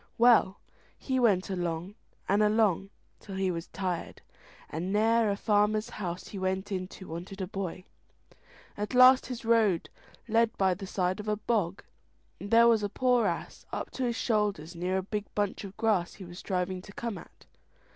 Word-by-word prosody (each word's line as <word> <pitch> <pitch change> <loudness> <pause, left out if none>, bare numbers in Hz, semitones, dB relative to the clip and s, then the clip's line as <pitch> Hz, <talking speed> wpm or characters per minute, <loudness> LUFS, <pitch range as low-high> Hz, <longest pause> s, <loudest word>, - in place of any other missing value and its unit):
Well, 230 -5 +5 0.4
he 260 -1 -1
went 200 -6 +2
along 175 0 -3 0.3
and 200 +2 +3
along 210 -3 +2 0.3
till 195 - -9
he 190 -1 0
was 165 0 -5
tired, 185 -3 -4 0.5
and 170 +5 -4
ne'er 220 +1 +3
a 200 - +1
farmer's 210 0 +1
house 180 -3 -5
he 200 - -6
went 190 +2 -2
into 185 0 -5
wanted 175 +4 -7
a 190 - -1
boy. 185 -1 -5 0.9
At 210 +5 -4
last 255 +1 +7
his 250 -2 -6
road 220 -7 +3 0.4
led 230 0 +2
by 190 -1 +3
the 195 +2 -7
side 185 +1 -1
of 210 - -7
a 210 - +1
bog, 210 -4 -1 0.6
and 200 +4 -7
there 230 +1 +6
was 230 -2 +4
a 205 - -1
poor 250 +2 +2
ass - - -5
up - - -4
to 260 - -4
his 235 -1 -1
shoulders 205 -9 -1
near 180 +2 -1
a 190 - -1
big 210 +1 -3
bunch 205 -1 -1
of 195 -1 -9
grass 205 -6 +1
he 195 - -10
was 175 +1 -10
striving 185 -1 -2
to 205 - -13
come 230 -5 -4
at. - - -17
200 Hz, 180 wpm, -29 LUFS, 185-220 Hz, 0.9 s, last